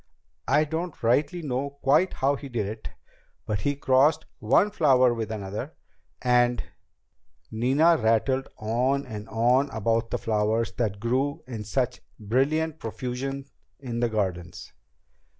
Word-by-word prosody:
I 145 +3 +4
don't 160 +1 -4
rightly 145 +9 +1
know 140 +1 -3
quite 150 +8 +3
how 140 +2 +1
he 140 0 -8
did 115 -5 -2
it, 110 +2 -6 0.6
but 105 -2 -1
he 145 +6 -1
crossed 145 +3 +3
one 135 - +3
flower 130 -9 +4
with 115 -2 -4
another, 105 +7 -5 0.5
and 125 -1 +3 0.5
..." 70 +4 -44
Nina 135 +9 +3
rattled 125 +3 +1
on 125 +6 0
and 110 -3 -8
on 125 +5 +2
about 115 -1 0
the - - -1
flowers 110 +1 0
that 105 -4 -2
grew 130 +6 -1
in 115 -4 -6
such 125 +2 -1 0.2
brilliant 145 +9 0
profusion 130 +4 -4 0.3
in 120 -4 -4
the 120 0 +1
gardens. 90 -5 -3
125 Hz, 135 wpm, -26 LUFS, 110-140 Hz, 0.6 s, I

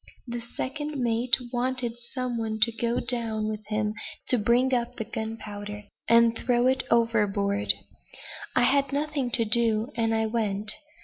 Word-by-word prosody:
The 240 0 -4
second 290 +5 -5
mate 235 0 +2 0.2
wanted 245 -1 -1
some 245 0 -3
one 220 -1 -3
to 230 - +5
go 235 +1 -1
down 225 -3 -1
with 215 0 -4
him 210 0 -1 0.4
to 250 - +4
bring 245 +5 +3
up 240 -1 0
the - - -3
gunpowder, 210 -2 -6 0.2
and 230 0 +5
throw 240 +1 +1
it 260 +1 +3
overboard. 210 -3 +2 0.8
I 250 - +4
had 275 +2 +3
nothing 285 -2 -1
to 230 -1 +1
do, 225 +2 +4
and 225 -1 +1
I 220 0 +1
went. 215 -2 0
235 Hz, 150 wpm, -27 LUFS, 220-245 Hz, 0.8 s, to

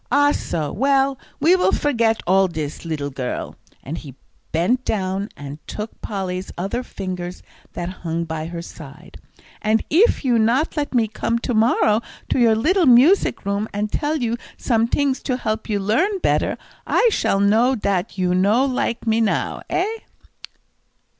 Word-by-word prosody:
"Ah, 290 +2 +4
so; 155 - -2
well, 270 +1 +2 0.2
we 330 +6 +5
will 370 - +2
forget 230 -6 +1
all 190 +1 +4
dis, 155 -2 -5
leedle 145 -3 -3
girl," 130 -2 -4 0.3
and 150 +6 -5
he 140 -5 -11 0.4
bent 225 +11 +1
down 195 -2 -2
and 145 +1 -8
took 215 +1 -7
Polly's 190 -3 -4
other 195 +7 -2
fingers 185 -6 -6 0.3
that 175 0 -4
hung 165 0 -2
by 160 -1 -4
her 170 0 -6
side. 155 0 -12 0.4
"And 215 +1 +2
eef 355 - +3
you 240 -3 +3
not 245 +10 +2
let 290 -3 -2
me 230 -2 +3
come 230 +2 -1
to 245 - -1
morrow 220 -1 +3 0.3
to - - +1
your 230 -2 +5
leedle 340 - +2
music 260 - +5
room, 200 +2 -1
and 210 +1 -2
tell 295 +2 0
you 240 -5 -1 0.2
sometings 260 +4 +1
to 255 -3 -1
help 220 -3 -3
you 210 - +1
learn 260 - +1
better, - - +1 0.3
I 480 - +3
shall 195 - +1
know 225 +6 +3
dat 200 -3 -1
you 180 -1 +1
no 205 +8 +3
like 250 -3 -2
me 225 0 +2
now 215 -3 0
eh?" 420 +5 0
220 Hz, 160 wpm, -21 LUFS, 180-255 Hz, 0.4 s, we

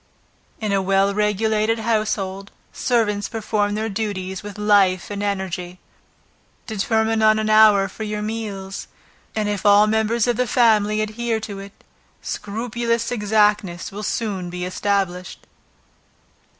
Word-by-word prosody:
In 215 -2 -2
a 195 -1 +2
well 195 +1 +2
regulated 215 +2 +1
household, 210 -3 -1 0.2
servants 210 -5 0
perform 210 -2 -1
their 220 +1 -2
duties 195 -3 -3
with 205 -1 -9
life 200 -3 +3
and 200 0 -4
energy. 190 -3 -3 0.9
Determine 220 0 0
on 215 0 +5
an 215 0 0
hour 215 -2 +6
for 195 - -12
your 210 -1 -3
meals, 205 -3 -5 0.5
and 215 -1 0
if 205 -2 -2
all 205 0 +6
the 215 - 0
members 220 +1 +1
of 240 -2 0
the 250 0 +1
family 215 -3 +3
adhere 220 +1 -2
to 205 -2 -6
it, 200 +1 -12 0.4
scrupulous 230 +2 -2
exactness 210 -5 +1
will 205 +2 -6
soon 200 -4 -2
be 180 0 -4
established. 185 -1 -2
210 Hz, 135 wpm, -21 LUFS, 195-220 Hz, 0.9 s, hour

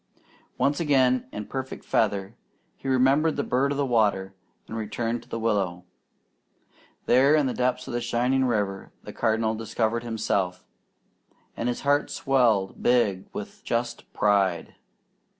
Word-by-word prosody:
Once 145 +1 +1
again 130 -5 +2
in 105 - -5
perfect 130 +2 -6
feather, 100 -3 0 0.4
he - - -9
remembered 135 +5 +3
the - - -1
bird 135 +3 +1
of 140 - -2
the 140 - +1
water, 105 -6 +1 0.3
and 110 - -7
returned 115 +2 -2
to - - -20
the - - -3
willow. 100 -6 -1 1.2
There 135 +4 +5
in 150 -2 +3
the 130 - -1
depths 125 0 -1
of - - -5
the 120 - -1
shining 130 +3 +1
river 105 -5 -1
the - - -9
Cardinal 110 -1 +1
discovered 115 +1 -1
himself, 100 -6 -2 0.9
and 120 - -2
his 120 - -3
heart 145 +1 +2
swelled 115 -8 +1
big 110 -7 +2
with 210 0 -8
just 120 0 -3
pride. 100 -5 +1
120 Hz, 145 wpm, -26 LUFS, 105-130 Hz, 1.2 s, There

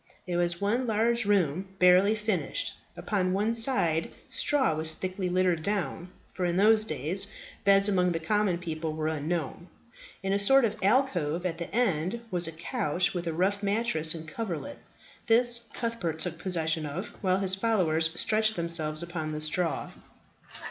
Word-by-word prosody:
It 180 -2 -4
was 175 0 0
one 235 +5 0
large 230 +2 +1
room, 190 -1 0
barely 185 +3 +5
furnished. 210 -3 -2 0.2
Upon 185 -3 -1
one 210 +4 0
side 225 -9 +3 0.2
straw 275 - +2
was 160 0 +2
thickly 185 0 -4
littered 180 -2 +1
down 180 -2 -3 0.2
for 185 - -4
in 175 0 0
those 215 +2 +4
days 160 +5 -1 0.4
beds 195 0 +5
among 180 -3 +1
the 165 - -2
common 195 +2 0
people 160 -2 -5
were 155 0 -4
unknown. 160 +1 -3 0.6
In 195 0 -1
a 200 - +1
sort 270 +5 +5
of 215 - -2
alcove 185 - +1
at 165 -2 -3
the 170 - -5
end 200 -2 0
was 175 -2 +2
a - - -5
couch 175 - -1
with 175 -2 -4
a 165 - -2
rough 195 +4 0
mattress 200 -7 +1
and 160 -1 -8
coverlet. 225 - -6 0.5
This 235 0 +5
Cuthbert 230 -9 -3
took 160 0 -4
possession 160 -4 0
of, 180 +8 -6
while 185 -1 +1
his 190 -1 +3
followers 185 -7 +1
stretched 215 0 +1
themselves 165 -2 0
upon 160 -3 -5
the 150 - -4
straw. 165 +2 -2
185 Hz, 160 wpm, -27 LUFS, 165-210 Hz, 0.6 s, barely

